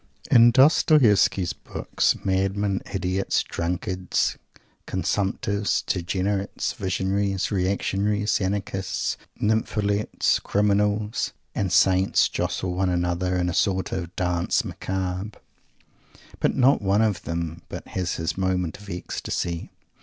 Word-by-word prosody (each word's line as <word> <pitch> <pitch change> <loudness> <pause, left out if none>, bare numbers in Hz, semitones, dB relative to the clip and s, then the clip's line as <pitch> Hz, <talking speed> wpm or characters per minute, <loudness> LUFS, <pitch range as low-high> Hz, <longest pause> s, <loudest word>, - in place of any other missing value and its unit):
In 120 0 +8
Dostoievsky's 115 - +4
books, - - -1
madmen, 95 +1 0
idiots, 95 0 0
drunkards, 90 +2 -1 0.5
consumptives, 100 +1 -1
degenerates, 95 +3 -1
visionaries, 95 +1 -1
reactionaries, 100 +2 0
anarchists, 95 0 -2 0.2
nympholepts, 105 -1 +1
criminals 105 +1 +1 0.2
and 95 -3 -1
saints 95 +1 +4
jostle 90 -1 -2
one 95 +1 0
another 90 +1 0
in 90 0 0
a 90 - -1
sort 95 0 +1
of 90 -1 -4
"Danse 90 -1 0
Macabre," 95 +2 -4 1.0
but - - +1
not 135 0 +4
one 100 +2 +2
of 105 -6 0
them 85 0 -4
but - - -7
has 90 -2 -2
his 80 +1 -2
moment 95 -3 -1
of 105 -1 -12
ecstasy. 85 -1 -4
95 Hz, 105 wpm, -24 LUFS, 90-105 Hz, 1.0 s, In